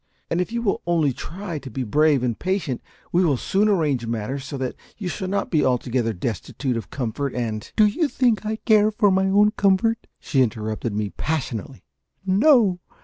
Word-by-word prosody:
And 170 - +2
if 180 - -3
you 235 0 -2
will 200 - 0
only 160 -6 +2
try 170 +3 -6
to 135 - -9
be 130 +2 -3
brave 145 +3 +3
and 120 -3 -1
patient 180 -9 -1 0.3
we 180 +2 +3
will 145 -7 +2
soon 200 - +1
arrange 150 - +1
matters 115 +4 -3
so 140 +1 -6
that 130 -1 -3 0.2
you 195 - -4
shall 185 +2 -3
not 200 +2 -2
be 155 -4 +3
altogether 125 -2 +1
destitute 120 +6 -3
of 110 -4 -5
comfort 130 +1 -3
and 110 -3 -3
" - - -48
"Do 215 - +6
you 250 +10 +1
think 240 -7 +1
I 215 +1 -2
care 215 -2 +4
for 210 -1 +2
my 190 +1 +2
own 205 +2 +4
comfort?" 210 +2 +1
she 135 - +1
interrupted 110 -2 -1
me, 105 -2 -2
passionately. 135 -9 -3 0.4
"No! 200 - +4
155 Hz, 195 wpm, -23 LUFS, 125-200 Hz, 0.4 s, Do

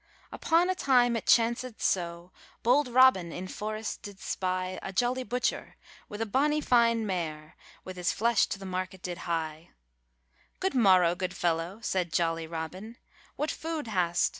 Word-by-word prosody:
Upon 335 +2 +2
a 370 - +1
time 250 -8 +3
it 230 - -4
chanced 235 0 +2
so 170 -1 -1 0.3
Bold 260 +4 +4
Robin 245 -9 +5
in 185 +3 -6
forrest 215 +2 -5
did 205 -3 -10
spy 185 0 -2
A - - -5
jolly 245 +6 0
butcher, 250 0 -2 0.3
with 210 +1 -6
a - - +1
bonny 290 +7 +1
fine 230 -5 +3
mare, 160 -5 -4 0.3
With 185 -1 -8
his 180 -1 0
flesh 230 0 +2
to - - -4
the 195 - -10
market 185 0 -4
did 175 -1 -5
hye. 160 -1 -3 0.9
'Good 380 +1 -1
morrow, 185 -8 +5
good 180 0 -4
fellow,' 175 +4 -1
said 180 -3 -1
jolly 165 0 0
Robin, 180 +8 -7 0.4
'What 300 - -1
food 320 -2 -4
hast? 180 -5 +1
195 Hz, 160 wpm, -29 LUFS, 175-240 Hz, 0.9 s, Robin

